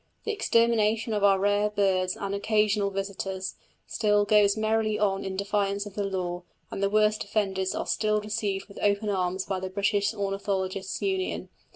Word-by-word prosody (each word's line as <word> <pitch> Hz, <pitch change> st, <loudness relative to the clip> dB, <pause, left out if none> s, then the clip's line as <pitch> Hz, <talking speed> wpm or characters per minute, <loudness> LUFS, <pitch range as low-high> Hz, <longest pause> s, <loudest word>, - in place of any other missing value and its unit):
The 445 Hz, -, -1 dB
extermination 230 Hz, -, +2 dB
of 205 Hz, -1 st, -1 dB
our 195 Hz, -1 st, +5 dB
rare 205 Hz, +1 st, +2 dB
birds 190 Hz, -3 st, +1 dB
and 200 Hz, 0 st, -3 dB
"occasional 210 Hz, 0 st, +1 dB
visitors" 195 Hz, -1 st, -4 dB, 0.3 s
still 210 Hz, -1 st, +2 dB
goes 205 Hz, 0 st, +4 dB
merrily 215 Hz, 0 st, +1 dB
on 195 Hz, -2 st, 0 dB
in 190 Hz, -1 st, -4 dB
defiance 200 Hz, 0 st, 0 dB
of 205 Hz, -, -9 dB
the 205 Hz, -, -2 dB
law, 180 Hz, -3 st, -3 dB, 0.3 s
and -, -, -4 dB
the 200 Hz, -, +2 dB
worst 215 Hz, +1 st, +2 dB
offenders 195 Hz, -2 st, -1 dB
are -, -, -2 dB
still 215 Hz, -1 st, +1 dB
received 205 Hz, -2 st, -3 dB
with 200 Hz, -, -12 dB
open 205 Hz, +1 st, +1 dB
arms 185 Hz, -1 st, -1 dB
by 190 Hz, -2 st, -2 dB
the 190 Hz, 0 st, -4 dB
British 205 Hz, +1 st, +1 dB
Ornithologists' 195 Hz, -2 st, -3 dB
Union. 380 Hz, -1 st, -2 dB
200 Hz, 170 wpm, -27 LUFS, 195-210 Hz, 0.3 s, our